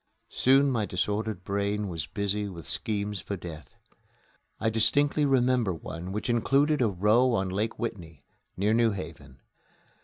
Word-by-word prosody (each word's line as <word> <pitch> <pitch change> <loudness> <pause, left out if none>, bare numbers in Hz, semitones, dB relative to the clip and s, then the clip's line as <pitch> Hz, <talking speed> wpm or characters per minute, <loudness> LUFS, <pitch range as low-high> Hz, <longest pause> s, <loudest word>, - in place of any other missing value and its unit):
Soon 135 +2 +4
my 110 -5 0
disordered 105 +1 -2
brain 100 +1 -1
was 80 -4 -4
busy 100 +3 -2
with 85 -5 -9
schemes 105 -2 -3
for 100 +2 -5
death. 80 -5 -10 0.8
I 110 0 +1
distinctly 145 +7 +2
remember 125 -7 +2
one 85 +3 -7
which 105 +2 -3
included 135 +5 +2
a 120 - +4
row 105 +7 +3
on 95 -4 0
Lake 105 +4 -2
Whitney, 85 - -6 0.3
near 105 +4 +2
New 115 0 +4
Haven. 75 -7 -9
105 Hz, 145 wpm, -28 LUFS, 90-115 Hz, 0.8 s, Soon